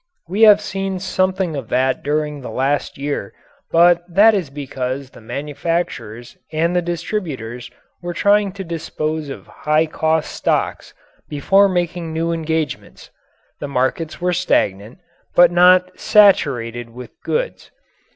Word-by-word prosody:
We 195 +6 -2
have 210 0 +6
seen 195 -2 -3
something 185 -2 -1
of 135 -6 -6
that 130 +1 +1
during 150 0 -2
the 125 - -7
last 140 +2 -1
year, 140 -7 -4 0.4
but 170 +1 +5
that 210 +5 +6
is 185 -8 -1
because 135 -1 -5
the - - -15
manufacturers 135 -4 -4
and 165 +3 0
the 180 - +3
distributors 160 - -4 0.3
were 175 -1 -5
trying 205 +2 +3
to 195 -1 -6
dispose 160 -3 -4
of 135 - -8
high 155 +1 0
cost 160 0 -1
stocks - - -2 0.3
before 195 +7 +3
making 175 -2 -2
new 165 +1 -1
engagements. 160 -2 -4 0.5
The 145 - -4
markets 140 +4 -2
were 180 0 0
stagnant, 110 - 0 0.4
but 175 -1 +7
not 180 +1 +4
"saturated" 120 - +3
with 125 +2 -11
goods. - - -3
160 Hz, 130 wpm, -19 LUFS, 140-180 Hz, 0.5 s, but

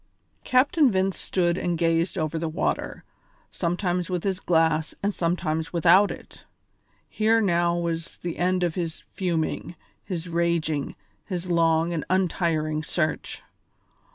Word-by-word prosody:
Captain 275 +3 +4
Vince 190 -2 +1
stood 175 -1 0
and 175 -1 -1
gazed 165 +2 +1
over 160 -1 -1
the 165 0 -2
water, 160 - -2 0.5
sometimes 175 0 -1
with 180 -2 -2
his 190 -2 -1
glass 160 -3 +1
and 205 +1 +1
sometimes 165 -2 -1
without 185 +4 +5
it. - - -10 0.6
Here 220 +1 +2
now 175 -4 +2
was 170 -1 -3
the 175 -1 -5
end 180 +1 +1
of 170 -2 0
his 165 -2 -4
fuming, 175 -1 -2 0.3
his 180 -3 -5
raging, 165 -4 -1 0.3
his 180 -2 -4
long 165 0 +2
and 160 - -2
untiring 165 -4 0
search. 155 0 -2
170 Hz, 130 wpm, -25 LUFS, 165-185 Hz, 0.6 s, without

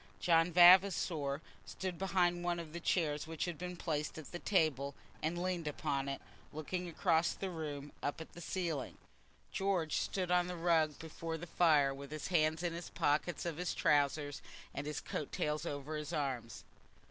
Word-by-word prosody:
John 165 0 +4
Vavasor 175 -5 +6 0.2
stood 170 - -5
behind 175 -2 +2
one 175 -1 0
of 160 -2 -8
the 170 - -4
chairs 155 -4 0
which 160 -1 -2
had 175 -4 -5
been 180 0 -5
placed 155 -3 -2
at 155 - -9
the 175 - -5
table, 145 -8 +1 0.3
and 165 +3 -1
leaned 175 -3 -1
upon 140 -2 -1
it, 135 - -4 0.3
looking 175 +4 -4
across 165 0 +2
the 190 -1 -4
room, 145 -3 -5
up 145 - -2
at 160 - -9
the 175 - -9
ceiling. 165 -5 -3 0.5
George 185 -5 0
stood 185 -2 -1
on 180 0 +4
the 180 -1 -4
rug 165 -3 +2
before 160 0 -5
the 170 - -7
fire, 155 -5 +4
with 140 0 -8
his 155 0 -5
hands 160 -1 +2
in 175 -1 0
the 170 - -5
pockets 165 +1 +1
of 165 -3 -2
his 180 0 -2
trousers, 145 -1 +2 0.3
and 140 +1 -4
his 150 -1 -3
coat 150 - -4
tails 150 +2 -1
over 145 +1 -4
his 150 +1 -4
arms. 135 -6 -3
160 Hz, 180 wpm, -35 LUFS, 150-175 Hz, 0.5 s, Vavasor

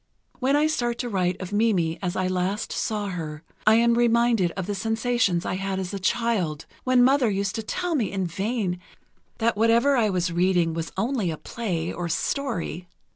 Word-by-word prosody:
When 265 +2 +2
I 295 +1 +3
start 240 -6 0
to 245 - -3
write 185 -3 0
of 185 +1 -6
Mimi 190 -7 +1
as 180 -2 -2
I 185 - 0
last 185 +3 -1
saw 210 -2 -2
her, 160 -4 -5 0.2
I 215 - +7
am 235 +1 +4
reminded 235 -4 +3
of 190 -2 -4
the 205 - -2
sensations 225 -3 0
I - - -1
had 195 0 -2
as 185 0 -4
a 200 - -3
child, 185 -7 0 0.2
when 255 -1 +4
Mother 260 -2 +4
used 195 -1 -1
to 225 - -3
tell 355 +10 -2
me 245 -10 0
in 190 -2 -1
vain 195 +1 -2 0.6
that 230 0 +1
whatever 230 +6 +4
I 225 -4 +3
was 180 -2 0
reading 175 -1 +2
was 165 0 -4
only 225 -3 0
a 160 - -3
play 175 -8 -3
or 175 - -4
a - - -3
story.... 180 - -2
205 Hz, 195 wpm, -25 LUFS, 180-235 Hz, 0.6 s, I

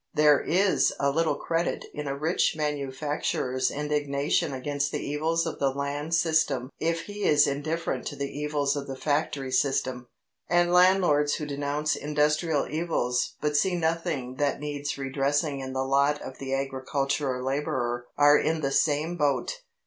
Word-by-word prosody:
There 150 -2 +5
is 190 +3 +2
little 150 +4 +1
credit 165 +1 -2
in 150 -1 -5
a 140 0 -2
rich 160 +3 +1
manufacturer's 140 -3 -1
indignation 145 +1 0
against 140 +2 -2
the - - -3
evils 160 +3 0
of 165 - -4
the 140 - +2
land 140 +4 -2
system 160 -6 +1
if 165 0 0
he 205 0 -7
is 145 -1 +5
indifferent 155 +4 -2
to 145 - -5
the 140 0 -3
evils 145 -1 0
of 140 -1 -4
the 135 - -5
factory 145 -1 -1
system, 130 -2 0 0.4
and 175 +1 +3
landlords 180 -5 +4
who 150 - -4
denounce 145 +1 -1
industrial 150 +1 +1
evils 150 -6 -1
but 150 0 0
see 180 +5 +2
nothing 160 -6 -2
that 145 -2 0
needs 145 -1 -4
redressing 140 +2 0
in 130 -1 -5
the 130 0 0
lot 140 +2 +2
of 130 - -9
the 135 -1 -5
agricultural 135 -1 -2
labourer 125 -3 -2
are 145 0 +6
in 160 +1 0
the 135 -2 -1
same 155 +4 +1
boat. 150 - 0
145 Hz, 155 wpm, -27 LUFS, 140-155 Hz, 0.4 s, are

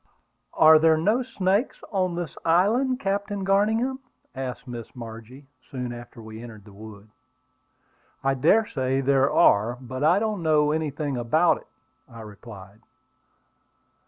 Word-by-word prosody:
"Are 155 0 +7
there 160 0 +4
no 210 +10 +1
snakes 205 -1 -1
on 185 -4 -1
this 170 -4 -5
island, 225 +10 +2
Captain 200 -1 -2
Garningham?" 220 +7 +1 0.3
asked 130 -2 -6
Miss 120 -1 -8
Margie, 115 +3 -10 0.2
soon 125 -2 -5
after 120 0 -11
we 110 0 -10
entered 110 -4 -11
the 105 - -15
wood. 105 0 -12 1.2
"I 135 0 +2
dare 170 - +3
say 135 -5 -1
there 135 0 +2
are; 110 +4 +3
but 130 +1 -6
I 165 +5 +4
don't 210 -2 -2
know 150 -2 +2
anything 150 -3 -2
about 155 +9 +2
it," - - -16 0.4
I 115 -2 -11
replied. 105 -2 -12
145 Hz, 135 wpm, -24 LUFS, 120-190 Hz, 1.2 s, Are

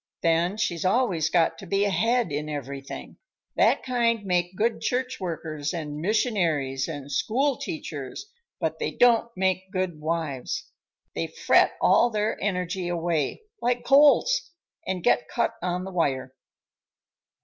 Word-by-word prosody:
Then 170 +4 +2
she's 170 -6 -1
always 185 -6 +2
got 165 -1 +2
to 195 - -10
be 195 +2 +1
ahead 225 +1 +1
in 150 +1 -3
everything. 140 -1 -6 0.4
That - - +3
kind 235 -4 +1
make 180 0 0
good 225 +3 0
church 255 +1 -1
workers 160 -3 -4
and 150 -3 -5
missionaries 165 - 0
and 145 -3 -7
school 260 - +1
teachers, 145 - -6 0.3
but - - -2
they - - -1
don't 235 -1 +4
make 190 0 0
good 185 -4 -2
wives. 155 -5 -3 0.4
They - - -2
fret - - +3
all 240 - +4
their 215 -1 0
energy 180 -2 -2
away, 170 - -1 0.2
like 245 0 0
colts, 295 - +5 0.4
and 185 -2 -2
get 245 - +3
cut 235 - 0
on 180 0 -2
the 190 - -6
wire." 135 -7 -1
180 Hz, 140 wpm, -26 LUFS, 155-225 Hz, 0.4 s, colts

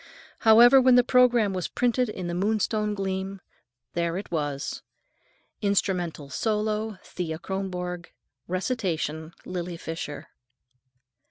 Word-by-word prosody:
However, 240 +4 +8
when 255 -1 +6
the 245 - +6
programme 245 -5 +4
was 185 -3 -2
printed 245 0 +1
in 185 -4 -5
the 175 - -3
Moonstone 210 +2 0
Gleam, 195 0 -3 0.5
there 170 0 -1
it 200 - -7
was: 145 -4 -3 0.8
"Instrumental 180 -7 0
solo, 215 0 -1
Thea 165 -3 -4
Kronborg. 180 -1 -4 0.4
Recitation, 170 - -2
Lily 175 -1 -4
Fisher." 165 -3 -6
190 Hz, 105 wpm, -26 LUFS, 175-220 Hz, 0.8 s, However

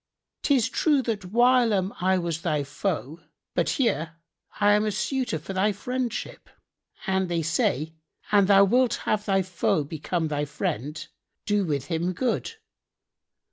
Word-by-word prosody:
'Tis 260 -6 +3
true 280 +2 +2
that 215 -5 -3
whilome 230 -2 +3
I 190 +1 +3
was 170 -2 -2
thy 150 -3 0
foe 160 0 -3 0.3
but - - +1
here 165 - 0 0.4
am 205 0 +4
I - - -1
a - - 0
suitor 250 - -1
for 160 +5 -7
thy 195 +3 +2
friendship, 250 +4 -4 0.6
and 190 -2 0
they 170 -1 0
say, 155 -1 0 0.4
'An 200 -2 +5
thou 200 0 +7
wilt 240 +3 +3
have 210 -1 0
thy 195 -2 +2
foe 175 -4 0
become 160 +2 -3
thy 145 -1 -1
friend, 145 +1 -4 0.4
do 205 -2 +1
with 145 -5 -2
him 175 +2 -1
good.' 250 - -1
190 Hz, 145 wpm, -26 LUFS, 160-220 Hz, 0.6 s, thou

